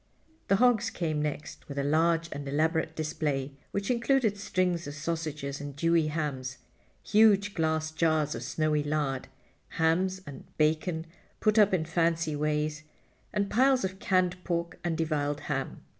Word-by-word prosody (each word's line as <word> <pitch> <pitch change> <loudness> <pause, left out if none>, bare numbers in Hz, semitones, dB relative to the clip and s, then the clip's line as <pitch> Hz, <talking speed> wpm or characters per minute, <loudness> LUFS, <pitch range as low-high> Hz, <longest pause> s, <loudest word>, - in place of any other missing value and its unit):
The 195 - +4
hogs 245 0 +3
came 155 -3 -2
next 150 0 -5
with 140 - -6
a 140 - +1
large 165 +3 +2
and 140 -1 -5
elaborate 160 +2 0
display, 150 -3 -2 0.2
which 200 +3 -2
included 235 -2 +2
strings 180 -4 -1
of 145 - -6
sausages 155 -3 -3
and 145 -1 -6
Dewey 165 +1 +2
hams, 140 -5 -3 0.5
huge 205 -2 +4
glass 160 -2 0
jars 155 -2 +1
of - - -5
snowy 155 -1 0
lard, 145 -3 -1 0.5
hams 180 +4 +2
and 140 -2 -9
bacon 160 +2 +1 0.3
put 215 0 +3
up 205 -1 +6
in 175 -4 +1
fancy 165 -1 +1
ways, 150 +1 -1 0.5
and 200 -1 -1
piles 260 -1 +4
of 190 0 -5
canned 185 -2 +1
pork 170 -1 -2
and 170 -2 -1
deviled 145 -3 -1
ham. 135 -2 -4
160 Hz, 150 wpm, -29 LUFS, 150-185 Hz, 0.5 s, up